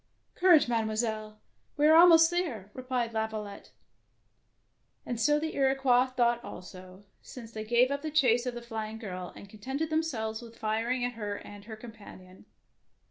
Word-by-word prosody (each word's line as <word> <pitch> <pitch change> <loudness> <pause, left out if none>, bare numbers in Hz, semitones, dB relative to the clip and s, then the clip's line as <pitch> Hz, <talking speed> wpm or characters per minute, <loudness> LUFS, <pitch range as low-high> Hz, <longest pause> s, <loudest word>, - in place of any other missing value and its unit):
" - - -45
Courage, 350 -7 +6
Mademoiselle! 220 -2 -2 0.4
we 295 - +3
are 315 +1 +7
al 340 +2 +9
most 325 -1 +6
there,'' 260 - -3
replied 255 -2 -3
Laviolette; 220 -2 -4 1.4
and 240 -2 -4
so 295 +4 +3
the 315 +1 -4
Iroquois 265 -2 +3
thought 240 -2 0
also, 185 0 -11 0.2
since 230 -3 -11
they 215 -1 -6
gave 240 +4 +3
up 280 0 -2
the 310 - -4
chase 250 -5 +2
of 245 - -3
the 240 - -7
flying 220 -2 -5
girl, 185 -5 -7
and 200 - -11
contented 265 +10 -5
themselves 240 -9 -2
with 230 -1 -13
firing 230 +3 -1
at 245 - -3
her 210 -3 -4
and 205 0 -12
her 220 0 -8
companion. 210 -5 -13
235 Hz, 165 wpm, -29 LUFS, 215-265 Hz, 1.4 s, al